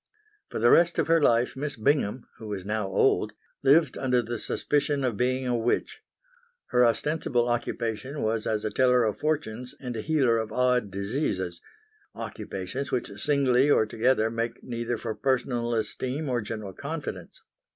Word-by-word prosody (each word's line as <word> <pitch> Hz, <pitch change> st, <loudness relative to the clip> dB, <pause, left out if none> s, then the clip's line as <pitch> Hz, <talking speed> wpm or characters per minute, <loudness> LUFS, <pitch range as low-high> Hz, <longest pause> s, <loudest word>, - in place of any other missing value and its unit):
For -, -, -5 dB
the 120 Hz, +2 st, +4 dB
rest 170 Hz, 0 st, +5 dB
of -, -, +2 dB
her 165 Hz, +1 st, +3 dB
life 120 Hz, -3 st, +3 dB
Miss 145 Hz, +2 st, -3 dB
Bingham, 120 Hz, -1 st, +1 dB
who 110 Hz, -, -8 dB
was 100 Hz, -3 st, -5 dB
now 105 Hz, -1 st, -1 dB
old, 95 Hz, -, +2 dB, 0.3 s
lived 145 Hz, +1 st, +4 dB
under 125 Hz, -2 st, +2 dB
the 120 Hz, 0 st, -4 dB
suspicion 145 Hz, -1 st, 0 dB
of 125 Hz, -4 st, 0 dB
being 130 Hz, +4 st, 0 dB
a 125 Hz, -1 st, +1 dB
witch. 115 Hz, +1 st, -1 dB, 0.7 s
Her 125 Hz, -, +4 dB
ostensible 120 Hz, 0 st, +1 dB
occupation 120 Hz, +3 st, -2 dB
was 110 Hz, 0 st, 0 dB
as 110 Hz, -1 st, -1 dB
a 110 Hz, -, -1 dB
teller 125 Hz, +1 st, +4 dB
of 110 Hz, -2 st, -1 dB
fortunes 125 Hz, -6 st, -2 dB
and 125 Hz, -2 st, -5 dB
a 110 Hz, -, -3 dB
healer 130 Hz, -5 st, +2 dB
of 110 Hz, -1 st, -4 dB
odd 125 Hz, -2 st, +2 dB
diseases 100 Hz, -, -2 dB, 0.5 s
occupations 100 Hz, +9 st, -5 dB
which 105 Hz, -5 st, -3 dB
singly 140 Hz, -2 st, +3 dB
or 110 Hz, -, +4 dB
together 115 Hz, 0 st, +1 dB
make 115 Hz, 0 st, -3 dB
neither 120 Hz, -1 st, -3 dB
for 110 Hz, 0 st, -4 dB
personal 120 Hz, -2 st, 0 dB
esteem 130 Hz, +7 st, -2 dB
or 120 Hz, -2 st, 0 dB
general 105 Hz, -2 st, -6 dB
confidence. 150 Hz, -, -6 dB
120 Hz, 160 wpm, -27 LUFS, 110-135 Hz, 0.7 s, rest